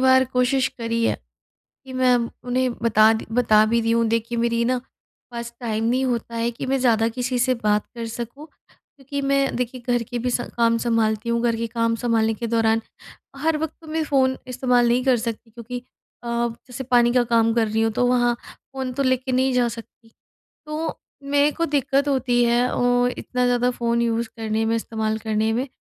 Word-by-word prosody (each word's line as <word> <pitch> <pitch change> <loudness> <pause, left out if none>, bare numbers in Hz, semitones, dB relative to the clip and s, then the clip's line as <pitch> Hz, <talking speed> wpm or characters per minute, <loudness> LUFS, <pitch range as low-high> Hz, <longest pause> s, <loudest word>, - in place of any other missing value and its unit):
बार 260 0 +5
कोशिश 250 +1 +2
करी 230 0 -1
है - - +1 0.7
कि 265 - -10
मैं 255 -1 +3 0.3
उन्हें 255 0 +1
बता 220 -1 +5
दी 220 - -5
बता 220 -3 +4
भी 230 +2 +2
दी 230 - 0
हूँ 230 0 +3
दे 230 +1 +3
कि 235 +2 -6
मेरी 235 0 +1
ना 250 +1 +1 0.5
पास 235 0 -6
टाइम 225 -2 -2
नहीं 255 +3 +1
होता 235 -2 -2
है 230 +1 0
कि 235 - -6
मैं 270 +1 +1
ज़्यादा 225 -3 +3
किसी 250 +2 -2
से 255 +1 +2
बात 210 -3 0
कर 230 -1 -4
सकूँ, 240 +6 -7
क्योंकि 280 -2 -10
मैं 275 0 +1
देखिए 250 +1 -3
घर 240 -1 +1
के 245 - -2
भी 250 +2 -1
स 245 - 0 0.2
काम 230 -1 +3
सँभालती 225 -1 0
हूँ। 235 0 +1
घर 235 -1 +1
के 230 - -2
काम 230 0 0
सँभालने 225 -2 +1
के 235 +2 -4
दौरान 225 -1 +2 0.6
हर 310 +3 0
वक़्त 315 0 -3
तो 325 - -15
मैं 320 0 0
फ़ोन 260 -3 +2
इस्तेमाल 250 -1 +2
नहीं 245 +2 +2
कर 260 -2 +4
सकती 230 0 -5
क्योंकि 240 +2 -7 0.4
अ, - - -10 0.4
जैसे 255 +1 -7
पानी 240 -1 +3
का 250 - +4
काम 225 0 +4
कर 230 -1 +2
रही 220 +1 0
हूँ 225 - +2
तो 245 +3 +1
वहाँ 240 -1 +3
फ़ोन 265 -1 -7
तो 275 +3 -1
लेके 260 0 0
नहीं 260 +1 +2
जा 250 -1 +2
सकती। 230 0 -11 0.6
तो 310 +1 -4 0.2
मेरे 285 +1 +2
को 335 +2 -1
दिक्कत 280 -1 +1
होती 250 -3 +2
है 235 +1 +3
ओ 245 0 +2
इतना 250 0 -1
ज़्यादा 245 0 +2
फ़ोन 235 -1 0
यूज़ 230 0 0
करने 220 0 -1
में, 225 - +1
इस्तेमाल 220 -1 -2
करने 220 0 0
में। 250 +4 -1
240 Hz, 205 wpm, -22 LUFS, 230-255 Hz, 0.7 s, बार